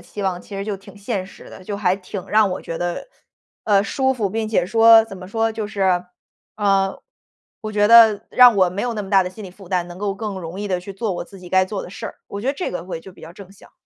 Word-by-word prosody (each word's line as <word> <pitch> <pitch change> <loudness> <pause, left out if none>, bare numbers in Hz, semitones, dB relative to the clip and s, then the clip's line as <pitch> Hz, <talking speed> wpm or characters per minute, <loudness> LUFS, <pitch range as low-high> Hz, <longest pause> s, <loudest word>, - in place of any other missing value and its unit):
期 205 - -8
望 185 -2 -1
其 200 - -9
实 195 - -4
就 210 -1 -3
挺 195 - -15
现 200 -2 -4
实 - - -14
的， - - -12
就 200 +2 -5
还 185 -3 +1
挺 190 0 -8
让 215 -1 +4
我 - - -5
觉 165 - -5
得， 175 - -3 0.6
呃， 200 -2 +4
舒 265 +3 0
服， 210 -6 -2
并 220 +1 -2
且 210 -5 +1
说 225 +3 +6
怎 205 -3 -10
么 185 0 -10
说？ 225 +1 0
就 220 -1 -4
是， 190 -3 0 0.5
呃， 195 -2 +1 0.6
我 215 - -5
觉 205 -1 +2
得 225 -2 +7
让 245 -4 +7
我 185 -2 +4
没 190 +3 -4
有 240 0 -2
那 210 - -3
么 195 - -9
大 195 -2 +5
的 180 - -4
心 205 +3 -11
理 185 - -9
负 190 0 -15
担， 180 -2 0
能 175 0 -10
够 200 0 -2
更 200 -2 -5
容 170 +2 -7
易 205 - -3
地 185 -3 -1
去 195 +2 -9
做 215 0 -2
我 175 - -4
自 195 +2 -14
己 180 -1 -12
该 185 0 +4
做 195 0 -4
的 - - -10
事 - - -7
儿， - - -8
我 200 - -6
觉 230 - -6
得 275 - +1
这 360 - -3
个 180 - -5
会 180 -2 -5
就 190 +3 -13
比 - - -18
较 160 - -10
正 195 -1 -13
向。 200 - -19
200 Hz, 305 characters per minute, -21 LUFS, 185-215 Hz, 0.6 s, 得